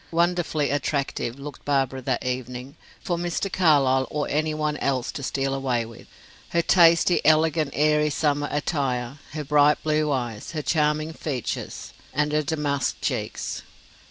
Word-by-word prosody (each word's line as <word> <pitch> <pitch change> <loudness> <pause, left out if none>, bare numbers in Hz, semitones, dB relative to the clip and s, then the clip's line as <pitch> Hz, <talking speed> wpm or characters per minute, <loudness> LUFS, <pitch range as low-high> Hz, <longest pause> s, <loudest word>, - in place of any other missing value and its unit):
Wonderfully 170 -3 +1
attractive 140 -3 -1
looked 140 +1 -9
Barbara 135 -2 0
that 130 0 -2
evening, 125 +2 -4 0.3
for 175 -2 -1
Mr. 175 +2 -2
Carlyle 135 -7 +4
or 150 -1 -2
any 155 +2 0
one 150 -1 -1
else 130 -2 -1
to - - -6
steal 135 0 -1
away 130 -4 0
with. 115 0 -13 0.4
Her 170 0 +1
tasty, 170 0 +5
elegant 155 0 +3
airy 150 0 +3
summer 145 -1 0
attire, 135 -3 -1
her 155 -1 -3
bright 145 +1 +4
blue 155 -1 +1
eyes, 120 -2 -3
her 155 -2 -3
charming 155 0 +1
features, 135 -7 -4 0.2
and 150 +1 +1
her 150 0 +2
damask 145 -2 -1
cheeks! - - -3
145 Hz, 145 wpm, -25 LUFS, 135-155 Hz, 0.4 s, tasty